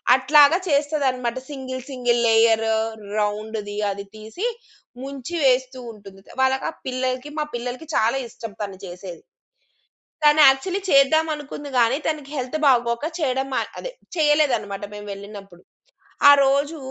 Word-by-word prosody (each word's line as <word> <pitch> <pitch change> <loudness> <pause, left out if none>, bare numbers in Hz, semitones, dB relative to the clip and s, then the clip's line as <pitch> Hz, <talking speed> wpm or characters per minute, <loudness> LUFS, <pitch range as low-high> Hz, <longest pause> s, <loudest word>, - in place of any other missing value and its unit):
అట్లాగా 290 +4 +5
చేస్తది 290 0 +1
అనమాట 250 -1 -3
సింగిల్ 260 -2 -6
సింగిల్ 245 -2 0
లేయరు 225 0 +3 0.4
రౌండ్‌ది 210 0 -3
అది 200 0 -7
తీసి 220 - -5 0.6
ముంచి 275 +4 -6
వేస్తూ 260 0 +2
ఉంటుంది. 195 -3 -14 0.2
వాళ్ళకా 265 0 +1 0.2
పిల్లలకి 255 +2 -3
మా 300 - 0
పిల్లలకి 250 +5 -5
చాలా 230 +5 +2
ఇష్టం 225 -2 -9
తను 195 -2 -6
చేసేది. 175 -1 -9 1.0
తను 295 +1 +5
యాక్చువలీ 360 +9 -1
చేద్దాం 275 +4 +5
అనుకుంది 290 0 -8
గానీ 235 +3 +3
తనకి 300 -3 -3
హెల్త్ 260 +4 -3
బాగోక 235 0 +2
చేయడం 265 -4 -1
మా - - +2 0.2
అదే - - -6 0.3
చేయలేదనమాట 255 -10 +1
మేము 205 0 -9
వెళ్ళినప్పుడు. 200 -3 -11 0.7
ఆరోజు 280 +2 +4
255 Hz, 125 wpm, -22 LUFS, 220-285 Hz, 1.0 s, అట్లాగా